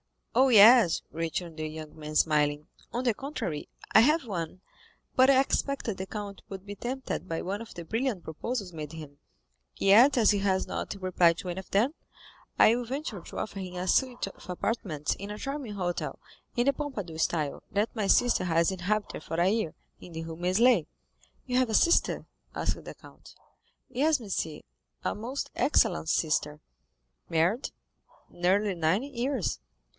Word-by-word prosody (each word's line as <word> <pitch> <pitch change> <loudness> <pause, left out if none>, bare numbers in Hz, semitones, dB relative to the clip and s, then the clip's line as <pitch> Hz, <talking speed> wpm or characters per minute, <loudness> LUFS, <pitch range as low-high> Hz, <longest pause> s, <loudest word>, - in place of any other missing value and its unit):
"Oh, 260 +3 +5
yes," 225 -4 +7
returned 165 +1 -4
the 155 0 -3
young 155 0 -8
man, 155 -1 -8
smiling; 150 -1 +2 0.2
"on 245 +2 -2
the 240 -3 +2
contrary, 230 - -4 0.3
I - - +9
have 300 +5 +4
one, 180 -3 -5 0.5
but 260 0 +6
I 265 -1 +6
expected 270 -5 -1
the 190 - -5
count 200 -1 -6
would 195 0 -8
be 205 - -6
tempted 250 -1 -4
by 165 -2 -2
one 200 +4 -3
of 230 - -10
the 170 - -6
brilliant 225 -1 -1
proposals 195 +4 -4
made 155 -1 -7
him, 150 -3 -9 0.6
yet 235 +8 +6
as 220 -3 +5
he 205 - +1
has 190 -1 +1
not - - -4
replied 180 -2 +3
to 185 - -5
any 175 +1 -3
of 190 - -11
them, 230 +9 +2 0.6
I 225 - +6
will 245 0 -3
venture 255 -4 -4
to - - -10
offer 200 - -4
him 185 -1 -6
a 180 +1 -3
suite 250 +4 +2
of 195 - -12
apartments 175 -5 -2
in 200 +1 -8
a 210 - -5
charming 275 -3 -5
hotel, 180 -3 -3 0.4
in 240 - +2
the 280 - +4
Pompadour 215 - -5
style, 155 -3 0
that 205 +4 0
my 210 -3 -1
sister 240 -4 +3
has 165 0 +2
inhabited 190 0 -2
for - - -5
a 175 +2 +4
year, 215 -6 -1 0.2
in 175 - -12
the 160 0 -5
Rue 165 0 -7
Meslay." 185 +9 +3 0.6
"You 250 -1 0
have 255 -2 +3
a 220 - 0
sister?" 340 - +3 0.3
asked - - -2
the - - -9
count. - - -16 0.5
"Yes, 285 +4 +2
monsieur, 170 -7 -3 0.4
a - - 0
most 245 +6 -5
excellent 215 - +2
sister." 150 -2 0 0.7
"Married?" 170 - +1 0.6
"Nearly 195 +3 +1
nine 170 +6 +1
years." 265 -4 -2
200 Hz, 170 wpm, -28 LUFS, 170-245 Hz, 0.7 s, I